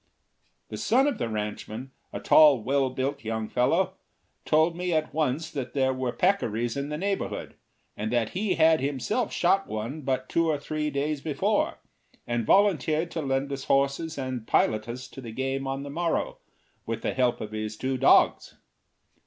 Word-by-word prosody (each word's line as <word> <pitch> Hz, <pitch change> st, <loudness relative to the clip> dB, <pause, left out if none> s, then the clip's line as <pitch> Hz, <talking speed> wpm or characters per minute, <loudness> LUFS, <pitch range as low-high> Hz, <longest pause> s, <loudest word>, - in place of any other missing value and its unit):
The -, -, -6 dB
son 260 Hz, +4 st, +3 dB
of 290 Hz, -, -1 dB
the 120 Hz, -, -1 dB
ranchman, 110 Hz, +4 st, -5 dB, 0.2 s
a -, -, -5 dB
tall, 145 Hz, -7 st, +6 dB
well 135 Hz, +1 st, +1 dB
built 135 Hz, +2 st, -3 dB
young 110 Hz, 0 st, -3 dB
fellow, 175 Hz, -, +1 dB, 0.5 s
told 160 Hz, +2 st, +3 dB
me 180 Hz, +1 st, -2 dB
at 155 Hz, -1 st, 0 dB
once 155 Hz, 0 st, -1 dB
that 130 Hz, -4 st, -5 dB
there 130 Hz, -1 st, +2 dB
were 130 Hz, -1 st, -2 dB
peccaries 120 Hz, -, 0 dB
in 140 Hz, +1 st, -3 dB
the 150 Hz, -, -3 dB
neighborhood, 195 Hz, +3 st, -3 dB, 0.4 s
and 110 Hz, +1 st, -3 dB
that 120 Hz, -3 st, +1 dB
he 195 Hz, +2 st, -1 dB
had 160 Hz, 0 st, +5 dB
himself 145 Hz, -, -1 dB
shot 195 Hz, +3 st, +2 dB
one 115 Hz, +8 st, -4 dB
but 130 Hz, -1 st, -2 dB
two 165 Hz, 0 st, +1 dB
or 155 Hz, -, +1 dB
three 150 Hz, +1 st, -3 dB
days 145 Hz, 0 st, -2 dB
before, 150 Hz, -2 st, 0 dB, 0.5 s
and 120 Hz, -2 st, -2 dB
volunteered 170 Hz, -4 st, +3 dB
to 165 Hz, -, -3 dB
lend 135 Hz, 0 st, -1 dB
us 135 Hz, -1 st, -4 dB
horses 140 Hz, +4 st, +1 dB
and 130 Hz, -4 st, -4 dB
pilot 110 Hz, +1 st, +2 dB
us 125 Hz, +1 st, -6 dB
to 135 Hz, -, -10 dB
the 115 Hz, -3 st, -8 dB
game 135 Hz, +3 st, -2 dB
on 135 Hz, +1 st, -3 dB
the 140 Hz, -, -7 dB
morrow, 170 Hz, +2 st, -1 dB, 0.5 s
with 115 Hz, 0 st, -3 dB
the -, -, -1 dB
help 125 Hz, -2 st, +1 dB
of 105 Hz, -, -6 dB
his 110 Hz, 0 st, -4 dB
two 130 Hz, +2 st, -1 dB
dogs. 130 Hz, +1 st, +4 dB
135 Hz, 175 wpm, -27 LUFS, 125-160 Hz, 0.5 s, tall